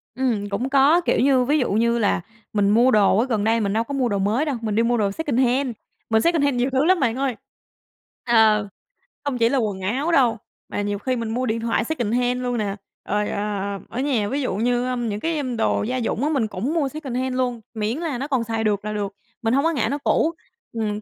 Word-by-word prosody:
Ừm, 230 -6 -1
cũng 235 +6 -2
có, 280 +5 +5
kiểu - - +1
như, 260 -1 +4
ví 290 +5 +2
dụ 255 - 0
như 235 +3 +2
là 205 -5 +1 0.3
mình 205 -1 +2
mua 235 +5 +5
đồ 205 -3 +4
ở 235 - +3
gần 225 -6 -1
đây 225 +2 +2
mình 200 -2 0
đâu 225 +1 +1
có 280 - -7
mua 260 -3 +1
đồ 200 - 0
mới 215 +9 +1
đâu, 290 -4 -1
mình 215 -2 -2
đi 230 - +3
mua 240 +1 +2
đồ 205 -3 +1
secondhand, 260 0 +1 0.4
mình 220 -1 +3
secondhand 290 -5 +2
nhiều 245 +2 +1
thứ 265 +2 +1
lắm 370 +1 +4
bạn 240 -5 +1
ơi. 265 -2 -1 0.9
Ờ, 220 -3 +4 0.6
không 280 -3 -2
chỉ 230 -1 +3
là 275 - +1
quần 210 -6 -1
áo 260 - -1
đâu 250 -8 +3 0.3
mà - - -2
nhiều 205 0 -2
khi 255 +2 -1
mình 230 -2 -3
mua 245 +3 -1
điện 230 -1 -1
thoại 230 -1 0
secondhand 245 -2 -1
luôn 245 -1 -1
nè. 205 -3 -2 0.3
Rồi, 210 +1 0
ờ, 200 -1 -2
ở 245 - -5
nhà 255 -7 0
ví 280 +2 -1
dụ 250 - -1
như, 245 +3 +1
ơ, 255 - -1
những 225 -4 -2
cái, 325 +6 -1
ưm, 255 -5 -3
đồ 225 - +1
gia 250 +4 -2
dụng 235 0 -1
á 300 - +1
mình 270 -8 +1
cũng 215 +9 -3
mua 305 -5 +1
secondhand 260 -3 -3
luôn, 250 -2 -1
miễn 220 +3 -2
là 320 -6 -3
nó 275 +4 -4
còn 265 -5 0
xài 225 -1 -2
được 205 -1 0
là 210 - -3
được. 200 -1 -3 0.3
Mình 225 0 +1
hông 275 +2 +3
có 330 - +2
ngại 265 -8 0
nó 285 - -1
cũ, 315 +3 +1 0.4
ừm, 215 -2 -2
240 Hz, 245 wpm, -22 LUFS, 215-265 Hz, 0.9 s, có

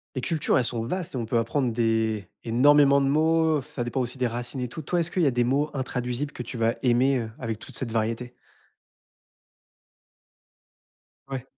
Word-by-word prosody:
Les 130 - -2
cultures, 160 +2 +1
elles 130 - +2
sont 120 -1 -1
vastes 180 +8 -4
et - - -3
on 120 - -2
peut 115 +2 0
apprendre 120 +2 0
des 110 -3 0 0.2
énormément 140 +4 +5
de 135 - +1
mots, 160 +1 +3
ça 130 -1 -4
dépend 120 +2 -2
aussi 125 +1 -2
des 130 - 0
racines 120 +3 -4
et 125 - -2
tout. 140 +7 -7
Toi, 175 +4 -1
est-ce 170 +1 0
qu'il 185 - 0
y 155 - +4
a - - +3
des 120 0 +1
mots 140 +5 +1
intraduisibles 130 +1 -3
que - - -7
tu 120 0 -6
vas 115 0 +2
aimer, 130 +2 +3
heu, 110 -1 -5
avec 115 -4 -4
toute - - -8
cette 120 -3 -3
variété? 115 +2 -2 2.9
Ouais. 135 -2 -5
125 Hz, 195 wpm, -26 LUFS, 115-140 Hz, 2.9 s, énormément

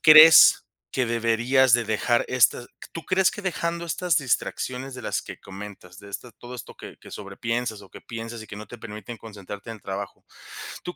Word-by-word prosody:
crees 155 0 +9 0.3
que 130 - 0
deberías 120 +2 +3
de 120 - +2
dejar 110 +2 +1
estas 125 -1 +3
q - - -15
tú 165 - -7
crees 190 +2 +3
que 205 - -8
dejando 170 -1 -2
estas 170 0 0
distracciones 130 0 -2
de 130 - -8
las - - -1
que - - -9
comentas, 95 -2 -11
de 100 - -12
esta 115 +4 -7
todo 120 +1 -11
esto 125 - -9
que - - -11
que - - -14
sobrepiensas 110 +2 -4
o 95 - -16
que - - -12
piensas 115 0 -7
y - - -12
que 100 - -9
no 105 - -8
te 120 +4 -11
permiten 110 +1 -8
concentrarte 105 0 -9
en 115 - -6
el 105 - -20
trabajo? 100 0 -6 0.6
¿Tú 175 - -6
115 Hz, 205 wpm, -25 LUFS, 105-130 Hz, 0.6 s, crees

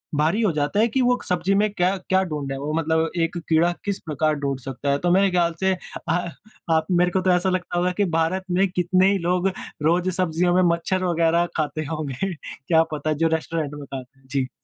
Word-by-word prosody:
भारी 160 +9 +2
हो 210 -5 +3
जाता 150 +6 -1
है 225 - +4
कि 260 +3 0
वो 245 0 +3
सब्ज़ी 180 +2 +1
में 210 +1 +3
क्या 180 -2 +2 0.2
क्या 190 0 +4
ढूँढ़े 140 -2 -3
वो 145 +2 -4
मतलब 160 0 +1
एक 165 +1 -1
कीड़ा 165 +2 +4
किस 200 -1 -2
प्रकार 155 0 0
ढूँढ़ 140 -2 -2
सकता 135 +2 -3
है। 140 - +2
तो 175 0 +1
मेरे 195 +2 +4
ख़्याल 170 -2 +2
से 190 0 +2 0.4
अ, 175 0 0 0.4
आप 160 0 +3
मेरे 180 0 +3
को 190 - +1
तो 185 0 +2
ऐसा 180 +1 +2
लगता 180 -1 -2
होगा 180 +1 +1
कि 205 - +3
भारत 185 +4 0
में 190 +2 +3
कितने 185 +2 +2
ही 200 - +2
लोग 180 +2 +1 0.4
रोज 175 +3 +2
सब्जियों 175 0 +1
में 185 - +4
मच्छर 185 +2 -2
वगैरह 170 0 +2
खाते 155 0 -2
होंगे 155 +4 -3
क्या 160 +2 0
पता 155 +1 -1
जो 165 - +5
रेस्टोरेंट 155 -2 -4
में 145 -1 -8
खाते 135 0 -10
जी। 135 -1 -1
170 Hz, 215 wpm, -23 LUFS, 155-185 Hz, 0.4 s, जो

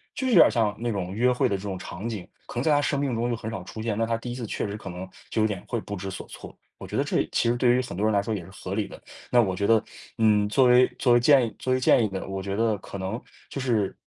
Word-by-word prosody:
就 265 - -3
有 250 - +1
点 180 - +9
儿 - - +1
像 110 -4 +1
那 120 0 -1
种 95 -2 -3
约 120 +5 +2
会 125 - +2
的 100 - 0
这 95 - -10
种 100 -2 -4
场 90 +3 -7
景， 105 -6 -5 0.2
可 - - -10
能 120 - -1
在 155 - +2
他 145 0 +4
生 145 0 0
命 140 -3 -1
中 120 +2 -1
就 120 - 0
很 110 0 -6
少 95 -5 -5
出 110 +4 -8
现， 110 -2 -2
那 115 - +1
他 115 - 0
第 120 +1 -6
一 - - -5
次 120 -3 -5
确 - - -3
实 100 - -5
可 105 -3 -8
能， 90 +1 -7 0.2
就 110 - 0
有 110 - +4
点 100 -4 -5
会 120 - -2
不 100 - -6
知 95 +1 -5
所 95 - -7
措。 - - -11 0.2
我 - - -9
觉 - - -4
得 - - +2
这 - - +1
其 - - +1
实 120 - +2
对 120 0 +4
于 130 - +2
很 125 - -7
多 100 +4 0
人 110 - +2
来 100 - +3
说， 110 - -2
也 90 - -5
是 90 - -13
合 95 0 -7
理 105 -1 0
的， - - -12 0.3
那 120 - +5
我 95 -4 0
觉 100 - -1
得， 110 -2 +5 0.4
嗯， 105 -2 +3
作 130 +4 +4
为 125 +1 +7
作 125 - +4
为 120 - +6
建 130 0 +5
议 110 - -10
作 130 - -2
为 130 - +2
建 125 - +4
议 - - +2
呢， 95 -1 -5
我 95 0 -4
觉 100 - -3
得 110 -1 +1
可 100 - -8
能 95 +4 -3 0.3
就 135 - -5
是， 110 -6 0
110 Hz, 360 characters per minute, -26 LUFS, 100-120 Hz, 0.4 s, 点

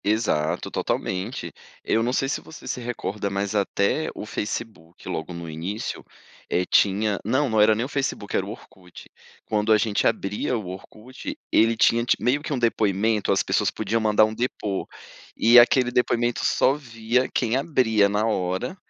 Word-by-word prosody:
Exato, 100 -8 0
totalmente. 95 +6 -3 0.3
Eu 115 - +1
não 120 +2 0
sei 135 +1 0
se 135 - -2
você 160 - -12
se 125 - -3
recorda, 105 -4 -4
mas 100 +1 -2
até 100 +8 0
o - - -6
Facebook 105 -6 -6
logo 80 +2 -4
no 85 -1 -7
início, 85 +7 -5 0.5
eh, 90 - +1
tinha 100 +1 +2
não, 130 +7 +1
não 110 -1 +3
era 110 +1 +5
nem 115 +3 -1
o - - -5
Facebook 135 -7 -3
era - - +1
o 100 - -7
Orkut. 95 -5 -12 0.4
Quando 105 0 0
a 110 - +7
gente 105 0 +1
abria 105 +5 -1
o 110 - -6
Orkut, 125 - -9
ele 115 +1 +3
tinha 115 +1 +4
ti 120 - +2
meio 135 +4 +1
que 155 - -6
um 140 - 0
depoimento, 110 -2 +1
as - - +2
pessoas - - +1
podiam 110 +2 -2
mandar 110 0 +4
um 110 - -4
depo 110 -4 -3 0.5
e 120 +2 +7
aquele 125 +1 +4
depoimento 120 -1 +1
só - - +3
via 120 -2 -1
quem 120 -1 0
abria 125 -8 +2
na 105 +2 0
hora, 95 - -1
110 Hz, 175 wpm, -24 LUFS, 100-120 Hz, 0.5 s, a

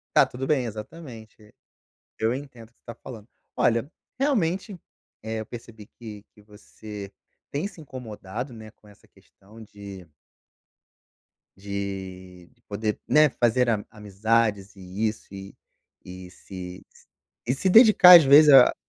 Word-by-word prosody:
Tá - - +6
tudo 130 +2 -7
bem, 145 -4 +1
exatamente. 110 -2 -11 0.7
Eu 110 +2 0
entendo 130 -5 -10
o 115 - -33
que - - -43
você - - -41
está 115 - -10
falando. 115 -5 -10 0.3
Olha, 115 +4 +1 0.3
realmente, 205 - -1 0.5
eh, 110 0 -4
eu 110 - -6
percebi 115 -3 -12
que 110 -4 -11
que 105 - -19
você 105 -1 -11 0.4
tem 145 +6 -3
se 200 - -9
incomodado, 125 -4 -8
né, 110 -2 -11
com 105 - -29
essa 105 - -22
questão 100 +3 -18
de 100 -3 -12 1.5
de 95 -2 -7 0.2
poder, 105 +1 -3
né, 150 0 +5
fazer 120 0 +1
ami 105 -3 -1
amizades, 105 0 -1
e 95 +3 -4
isso, 105 -2 -7
e 100 0 -10 0.5
e 90 0 -10
se 90 0 -11
s - - -22 0.4
e 125 - +1
se 190 +8 0
dedicar, 200 -4 +9
às 165 - +3
vezes, 145 +2 +7
a 130 -2 +7
110 Hz, 145 wpm, -24 LUFS, 100-130 Hz, 1.5 s, dedicar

